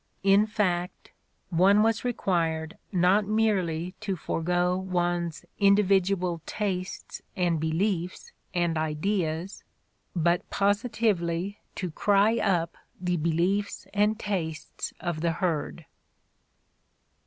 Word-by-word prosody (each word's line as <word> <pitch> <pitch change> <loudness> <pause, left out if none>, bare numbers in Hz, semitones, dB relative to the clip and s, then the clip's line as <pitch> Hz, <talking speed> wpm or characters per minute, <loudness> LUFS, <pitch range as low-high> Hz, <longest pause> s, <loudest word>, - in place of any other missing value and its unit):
In 200 +2 +5
fact, 180 -5 -1 0.4
one 195 +5 +5
was 225 -1 +1
required 165 -9 -1 0.2
not 190 +2 +3
merely 185 -6 +1
to 205 -3 -2
forgo 175 +2 0
one's 175 -3 -1
individual 195 -3 +3
tastes 190 -3 -4
and 175 -4 +1
beliefs 175 +3 -1 0.2
and 175 -3 0
ideas 160 +3 -2 0.5
but 170 +1 +1
positively 200 -3 0 0.2
to 180 -3 -3
cry 205 +6 +3
up 175 -6 0 0.2
the 180 -1 0
beliefs 175 +6 0
and 210 +1 +2
tastes 165 -8 -4
of 170 -3 -3
the 170 -1 +1
herd. 165 -2 -2
180 Hz, 95 wpm, -27 LUFS, 170-200 Hz, 0.5 s, In